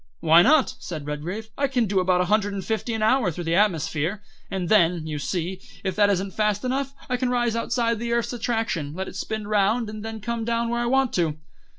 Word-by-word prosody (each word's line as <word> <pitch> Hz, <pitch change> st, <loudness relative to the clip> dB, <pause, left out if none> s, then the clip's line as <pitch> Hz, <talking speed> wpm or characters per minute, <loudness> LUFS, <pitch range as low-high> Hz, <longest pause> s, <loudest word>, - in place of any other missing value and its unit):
"Why 165 Hz, +2 st, +6 dB
not?" 275 Hz, -, +4 dB
said 155 Hz, -5 st, -6 dB
Redgrave; 175 Hz, +10 st, -5 dB
"I 280 Hz, -, +3 dB
can 250 Hz, -3 st, +1 dB
do 195 Hz, -2 st, +1 dB
about 180 Hz, 0 st, +2 dB
a -, -, +1 dB
hundred 205 Hz, +1 st, +1 dB
and 195 Hz, -2 st, -4 dB
fifty 225 Hz, +1 st, -2 dB
an 220 Hz, -, -1 dB
hour 230 Hz, -2 st, +3 dB
through 175 Hz, +1 st, -5 dB
the 165 Hz, 0 st, -1 dB
atmosphere, 180 Hz, 0 st, +1 dB, 0.3 s
and 185 Hz, -2 st, -2 dB
then, 175 Hz, -5 st, +3 dB
you 150 Hz, -2 st, -4 dB
see, 180 Hz, +4 st, -3 dB, 0.2 s
if 190 Hz, -1 st, -2 dB
that 205 Hz, -1 st, +4 dB
isn't 195 Hz, -1 st, -1 dB
fast 210 Hz, +1 st, 0 dB
enough 270 Hz, +2 st, -2 dB
I 250 Hz, -, 0 dB
can 250 Hz, 0 st, 0 dB
rise 240 Hz, -2 st, +1 dB
outside 230 Hz, -1 st, 0 dB
the 235 Hz, 0 st, -3 dB
earth's 235 Hz, +1 st, 0 dB
attraction, 225 Hz, -11 st, -2 dB
let 190 Hz, +1 st, -4 dB
it -, -, -9 dB
spin 215 Hz, -1 st, -4 dB
round, 210 Hz, +2 st, +1 dB
and 215 Hz, -1 st, -7 dB
then 225 Hz, 0 st, -5 dB
come 230 Hz, +2 st, -3 dB
down 230 Hz, 0 st, 0 dB
where 235 Hz, 0 st, -1 dB
I 240 Hz, -, 0 dB
want 265 Hz, 0 st, +2 dB
to." 160 Hz, -4 st, 0 dB
210 Hz, 230 wpm, -24 LUFS, 180-235 Hz, 0.3 s, Why